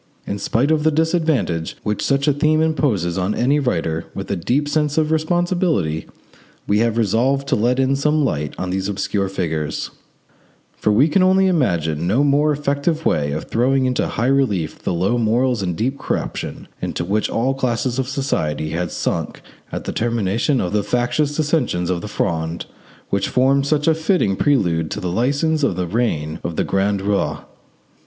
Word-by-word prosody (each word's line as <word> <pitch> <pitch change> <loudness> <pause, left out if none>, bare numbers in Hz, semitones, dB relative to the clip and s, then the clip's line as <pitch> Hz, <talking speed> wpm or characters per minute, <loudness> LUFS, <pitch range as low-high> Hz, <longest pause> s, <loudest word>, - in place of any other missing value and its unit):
In 100 - -4
spite 130 +10 +1
of 155 -1 +2
the 160 - +4
disadvantage 155 - 0
which 105 -1 -1
such 140 +1 +1
a 145 - +5
theme 155 +2 +2
imposes 120 - +1
on 95 +3 0
any 140 +5 +2
writer 85 - -1
with - - -5
a - - +1
deep 135 - 0
sense 150 0 0
of 155 -1 +2
responsibility, 160 - 0 0.6
we 105 +1 +2
have 115 0 +1
resolved 125 +6 +1
to - - +3
let 120 +4 +1
in 135 +1 +2
some 150 +1 +2
light 75 - -2
on 90 0 -3
these 95 +1 -2
obscure 100 0 -1
figures; 80 -5 -3 0.8
for 105 - +1
we 125 +8 +4
can 185 +4 +2
imagine 130 - +2
no 115 +10 +3
more 145 +1 +3
effective 150 +2 -1
way 70 -2 +1
of 75 - -3
throwing 130 +3 +1
into 125 -1 0
high 115 - -2
relief 125 - +1
the - - -2
low 95 +8 +1
morals 120 +1 +1
and 90 -3 -2
deep 135 +7 -1
corruption - - -4
into 85 - -3
which 105 +4 0
all 130 +4 0
classes 125 -1 -1
of 130 0 -1
society 80 - -1
had 85 +1 -2
sunk - - -3 0.3
at - - -4
the - - -3
termination 115 +3 0
of 90 - -2
the 105 - +2
factious 125 +7 0
dissensions 140 - 0
of 85 -2 -1
the - - -6
Fronde, 85 -4 -2 0.5
which 100 -1 0
formed 135 +2 +2
such 150 0 +1
a 160 - +6
fitting 160 - +1
prelude 85 - +1
to - - -4
the 90 - -3
licence 140 - +1
of 140 -10 +1
the 90 0 -1
reign 85 -7 -1
of 85 - -3
the - - +1
grand 95 0 0
roi. 100 0 0
120 Hz, 180 wpm, -20 LUFS, 95-145 Hz, 0.8 s, a